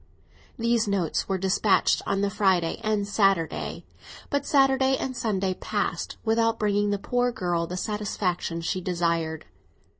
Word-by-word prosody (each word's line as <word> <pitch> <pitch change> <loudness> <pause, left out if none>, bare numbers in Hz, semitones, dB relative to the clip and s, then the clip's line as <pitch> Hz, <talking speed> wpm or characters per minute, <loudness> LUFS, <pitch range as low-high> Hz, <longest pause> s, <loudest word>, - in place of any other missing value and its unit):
These 230 -2 +1
notes 195 -5 -1
were 190 - +1
despatched 190 +2 +2
on 195 - 0
the 200 0 0
Friday 190 -5 +1
and 210 -2 0
Saturday; 195 -5 0 0.5
but 285 -1 -1
Saturday 270 -1 +3
and 260 -1 -4
Sunday 195 -5 -1
passed - - -3
without 225 0 +2
bringing 205 -1 +1
the 205 - +1
poor 245 +4 0
girl 175 -5 -1
the 180 - -5
satisfaction 185 -5 -2
she 185 +2 -2
desired. 170 -3 -1
200 Hz, 140 wpm, -26 LUFS, 180-225 Hz, 0.5 s, Saturday